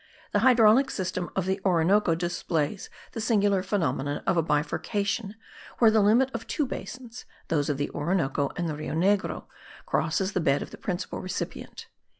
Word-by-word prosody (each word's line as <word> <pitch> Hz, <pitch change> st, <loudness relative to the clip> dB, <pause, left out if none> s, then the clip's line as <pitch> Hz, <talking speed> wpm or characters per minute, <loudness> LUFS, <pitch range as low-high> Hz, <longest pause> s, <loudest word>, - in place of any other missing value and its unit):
The 205 Hz, -, +2 dB
hydraulic 240 Hz, +2 st, +5 dB
system 185 Hz, -2 st, -3 dB
of 190 Hz, -, 0 dB
the 190 Hz, +1 st, -1 dB
Orinoco 180 Hz, 0 st, +3 dB
displays 175 Hz, 0 st, -2 dB, 0.2 s
the 225 Hz, -, -5 dB
singular 205 Hz, -4 st, +2 dB
phenomenon 165 Hz, -7 st, -1 dB
of 190 Hz, -, +2 dB
a 165 Hz, -, +3 dB
bifurcation 195 Hz, +8 st, -1 dB, 0.4 s
where 225 Hz, -2 st, +6 dB
the 220 Hz, -1 st, +4 dB
limit 235 Hz, +6 st, +4 dB
of 230 Hz, -, -5 dB
two 295 Hz, -, 0 dB
basins 250 Hz, -2 st, -8 dB, 0.2 s
(those 145 Hz, -3 st, +1 dB
of 145 Hz, -, 0 dB
the 145 Hz, -, -2 dB
Orinoco 145 Hz, -3 st, 0 dB
and 175 Hz, -, -2 dB
the 155 Hz, -, -2 dB
Rio 155 Hz, +1 st, -5 dB
Negro) 195 Hz, +4 st, +1 dB, 0.4 s
crosses 160 Hz, +5 st, 0 dB
the 185 Hz, -, 0 dB
bed 140 Hz, -2 st, +2 dB
of -, -, -11 dB
the -, -, -10 dB
principal 180 Hz, -2 st, -4 dB
recipient. 185 Hz, 0 st, -6 dB
190 Hz, 165 wpm, -27 LUFS, 160-215 Hz, 0.4 s, where